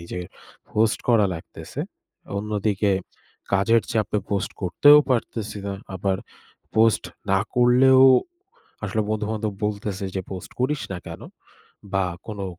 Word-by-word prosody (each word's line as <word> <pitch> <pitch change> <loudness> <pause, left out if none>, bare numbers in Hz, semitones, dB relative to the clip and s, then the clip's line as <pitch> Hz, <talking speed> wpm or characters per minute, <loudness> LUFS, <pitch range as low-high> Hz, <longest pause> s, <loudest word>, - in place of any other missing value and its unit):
নিজের 90 +1 -6 0.5
পোস্ট 110 +1 +2
করা 115 -4 +5
লাগতেছে। 80 - -8 0.6
অন্যদিকে 105 -1 0 0.6
কাজের 105 +4 +3
চাপে 105 -1 0
পোস্ট 100 -2 -1
করতেও 145 +12 +7
পারতেছি 115 -4 -1
না। 100 - -3 0.2
আবার 95 +1 0 0.6
পোস্ট 110 0 +4 0.3
না 95 - +4
করলেও 130 +2 +6 0.8
আসলে 105 +2 0
বন্ধু-বান্ধব 110 -1 -2
বলতেছে 100 -2 -4
যে - - 0
"পোস্ট 95 -2 -7
করিস 135 +2 +1
না 90 - -4
কেনো?" 85 0 -8 0.7
বা 95 -1 +2 0.2
"কোনো 105 -3 -5
105 Hz, 120 wpm, -23 LUFS, 95-115 Hz, 0.8 s, করতেও